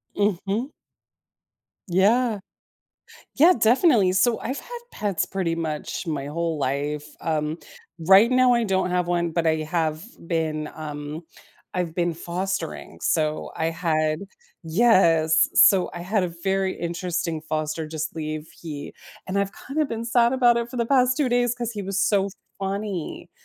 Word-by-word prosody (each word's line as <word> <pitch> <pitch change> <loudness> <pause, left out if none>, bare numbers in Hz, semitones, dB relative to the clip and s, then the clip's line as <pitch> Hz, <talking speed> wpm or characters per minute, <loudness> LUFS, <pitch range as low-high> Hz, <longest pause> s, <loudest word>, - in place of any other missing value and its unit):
Mhm. 205 - -1 1.2
Yeah. 210 +5 +2 1.0
Yeah, 330 +6 +6
definitely. 230 - +4
So 210 +5 +2
I've 260 +4 -3
had 485 0 -8
pets 205 -4 -1
pretty 185 -4 -2
much 160 +1 -4
my 145 -4 -3
whole 165 +1 -2
life. 145 +2 -2 0.2
Um, 155 0 -1 0.5
right 195 +6 +7
now, 255 -1 +5
I 235 -1 +2
don't 190 -3 0
have 180 -1 0
one, 170 -1 0
but 165 0 -1
I 160 0 +3
have 155 0 -1 0.2
been, 155 -2 -1
um 150 0 -6 0.5
I've 175 -3 -2
been 175 -1 0
fostering. 175 0 -4
So 155 -1 0
I 160 - 0
had 155 -2 0 0.5
Yes. 165 -6 +4
So, 190 -3 +6
I 175 - -6
had 190 +2 0
a - - -1
very 190 0 +1
interesting 170 -1 -3
foster 155 0 -3
just 155 +1 -5
leave, 155 0 -4
he 150 -4 -7 0.4
and 195 +2 -1
I've 200 0 -1 0.2
kinda 300 +2 0
been 230 -3 -4
sad 235 0 +3
about 245 -2 +4
it 235 0 -1
for 255 - -7
the 235 - +1
past 255 0 +3
2 290 -4 +1
days 245 -1 +2
'cause 240 -2 -3
he 205 -2 -5
was 195 +1 -2
so 200 -1 +2 0.3
funny. 195 -3 -4
180 Hz, 150 wpm, -24 LUFS, 160-220 Hz, 1.2 s, right